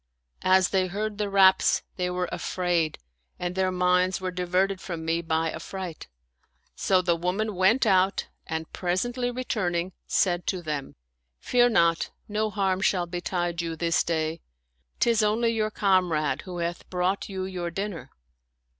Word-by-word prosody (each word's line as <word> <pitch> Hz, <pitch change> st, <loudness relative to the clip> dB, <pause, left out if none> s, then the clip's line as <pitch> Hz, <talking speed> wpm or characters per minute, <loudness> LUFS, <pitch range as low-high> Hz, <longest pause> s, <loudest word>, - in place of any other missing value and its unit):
As 185 Hz, 0 st, +4 dB
they 190 Hz, -1 st, +1 dB
heard 210 Hz, +3 st, -3 dB
the 205 Hz, -1 st, 0 dB
raps, 190 Hz, -1 st, +5 dB
they 180 Hz, -1 st, -1 dB
were 180 Hz, 0 st, -1 dB
afraid 175 Hz, -4 st, -1 dB, 0.4 s
and 175 Hz, 0 st, -3 dB
their 190 Hz, 0 st, +1 dB
minds 180 Hz, 0 st, +2 dB
were 185 Hz, -1 st, -3 dB
diverted 185 Hz, +2 st, 0 dB
from 165 Hz, -3 st, -5 dB
me 165 Hz, +1 st, +1 dB
by 160 Hz, -1 st, 0 dB
affright; 175 Hz, 0 st, -7 dB, 0.7 s
so 185 Hz, -1 st, +2 dB
the 175 Hz, -1 st, +2 dB
woman 185 Hz, +6 st, -1 dB
went 195 Hz, +8 st, +3 dB
out 190 Hz, -1 st, +3 dB, 0.2 s
and 160 Hz, 0 st, -4 dB
presently 240 Hz, +8 st, -1 dB
returning, 190 Hz, -8 st, -2 dB
said 175 Hz, -2 st, +1 dB
to 185 Hz, -3 st, -1 dB
them, 150 Hz, -3 st, -4 dB, 0.2 s
" 60 Hz, 0 st, -52 dB
Fear 245 Hz, -1 st, +5 dB
not; 170 Hz, -7 st, +3 dB, 0.2 s
no 215 Hz, +1 st, 0 dB
harm 190 Hz, -2 st, 0 dB
shall 185 Hz, -3 st, +2 dB
betide 175 Hz, 0 st, -2 dB
you 165 Hz, -1 st, -3 dB
this 165 Hz, 0 st, +1 dB
day. 160 Hz, 0 st, -1 dB, 0.6 s
Tis 230 Hz, -2 st, +3 dB
only 220 Hz, +2 st, +2 dB
your 215 Hz, -1 st, 0 dB
comrade 175 Hz, -9 st, +1 dB
who 180 Hz, -2 st, -6 dB
hath 170 Hz, 0 st, -4 dB
brought 185 Hz, +3 st, -1 dB
you 190 Hz, -1 st, -3 dB
your 180 Hz, -2 st, -4 dB
dinner." 170 Hz, -6 st, -5 dB
180 Hz, 155 wpm, -26 LUFS, 170-195 Hz, 0.7 s, raps